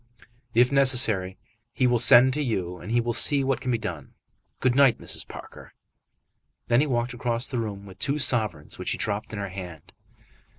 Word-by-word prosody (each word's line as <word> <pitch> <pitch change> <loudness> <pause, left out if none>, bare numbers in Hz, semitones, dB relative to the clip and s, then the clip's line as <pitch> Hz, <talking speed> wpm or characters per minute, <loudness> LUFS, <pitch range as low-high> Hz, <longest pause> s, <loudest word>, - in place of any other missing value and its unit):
"If 125 +2 +4
necessary, 120 -9 +4 0.4
he 130 - 0
will 120 -1 +2
send 125 +2 +6
to 150 - -2
you, 90 -9 -3
and 110 - -8
he 120 - +2
will 120 0 -2
see 140 +3 +3
what 135 0 -1
can 130 - -4
be 120 - +1
done. 110 -1 -8 0.4
Good 130 -1 +1
night, 135 -3 +4
Mrs. - - -2
Parker." - - -12 1.0
Then 120 +3 +3
he 150 - 0
walked 120 -2 -2
across 120 -2 -2
the 125 - -4
room 100 -3 -6
with 95 -2 -14
two 140 +1 -1
sovereigns 110 - -2
which - - -4
he - - -2
dropped 105 0 -3
in 110 - -7
her 100 -1 -5
hand. 90 -4 -10
120 Hz, 195 wpm, -25 LUFS, 100-130 Hz, 1.0 s, send